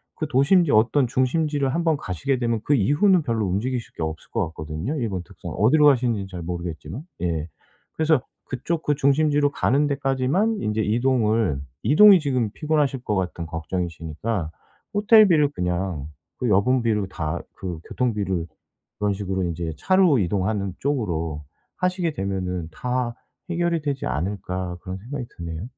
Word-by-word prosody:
그 155 - -3
도심지 145 +4 +4
어떤 120 +5 +4
중심지를 140 +2 0
한번 165 -3 +1
가시게 130 - -2
되면 115 -3 0
그 145 - +3
이후는 150 - +3
별로 115 -5 0
움직이실 115 +6 -2
게 - - -3
없을 80 0 -5
것 - - 0
같거든요, 80 - -5
일본 100 -8 -2
특성 85 -2 -9
어디로 145 - +4
가시는진 120 -7 +2
잘 90 -2 -7
모르겠지만 85 - -5 0.2
예 80 -2 -1 0.5
그래서 155 -4 +2 0.2
그쪽 155 +6 -3
그 145 - +1
중심지로 145 +1 +3
가는 145 +1 +2
데까지만 140 - +1
인제 105 0 0
이동을 110 - +1 0.2
이동이 195 +5 +8
지금 130 -8 0
피곤하실 150 -4 0
것 105 - -1
같은 90 -3 -2
걱정이시니까 85 +2 -3 0.4
'호텔비를 205 -8 +6
그냥 90 - -2 0.3
그 125 - 0
여분 120 +6 +3
비로 105 -4 +1
다 85 -3 -3 0.2
그 90 -4 -5
교통비를 100 -8 -1 0.5
그런 105 -1 +1
식으로 95 -1 -2
인제 85 -2 -3
차로 185 -8 +4
이동하는 100 +1 -1
쪽으로 85 - -2 0.3
하시게 180 -3 0
되면은 95 - -3
다 125 +1 -2 0.3
해결이 170 -1 0
되지 140 -2 -2
않을까?' 90 +1 -3
그런 95 0 -6
생각이 125 +5 -6
드네요. 85 0 -5
115 Hz, 345 characters per minute, -23 LUFS, 90-145 Hz, 0.5 s, 이동이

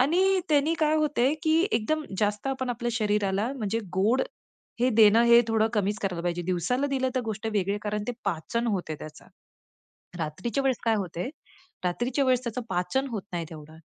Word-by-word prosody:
आणि 370 +7 +3
त्यांनी 300 +2 +3
काय 310 0 +3
होते 295 -3 +2
की 320 0 +3
एकदम 310 +7 0
जास्त 210 +3 0
आपण 260 -2 -2
आपल्या 240 0 -2
शरीराला 210 +1 0
म्हणजे 225 -1 -1 0.2
गोड 220 +8 +3 0.6
हे 255 +1 +3
देणं 220 +1 +7
हे 235 0 +7
थोडं 220 0 +2
कमीच 205 0 0
करायला 180 -3 -2
पाहिजे, 175 0 -1
दिवसाला 185 - 0
दिलं 260 -2 0
तर 255 - +1
गोष्ट 220 0 -4
वेगळी 200 0 0
कारण 210 0 -2
ते - - 0
पाचन 230 +9 -1
होते 180 -6 -2
त्याच. 155 0 -10 1.0
रात्रीच्या 185 - -2
वेळेस 265 -2 +2
काय 225 -1 +3
होते, 185 +3 -3 0.6
रात्रीच्या 240 +9 0
वेळेस 255 -1 +2
त्याचं 235 +1 -3
पाचन 180 +10 0
होत 210 -4 -3
नाही 170 -1 -2
तेवढं. 155 0 -11
225 Hz, 175 wpm, -27 LUFS, 195-260 Hz, 1.0 s, देणं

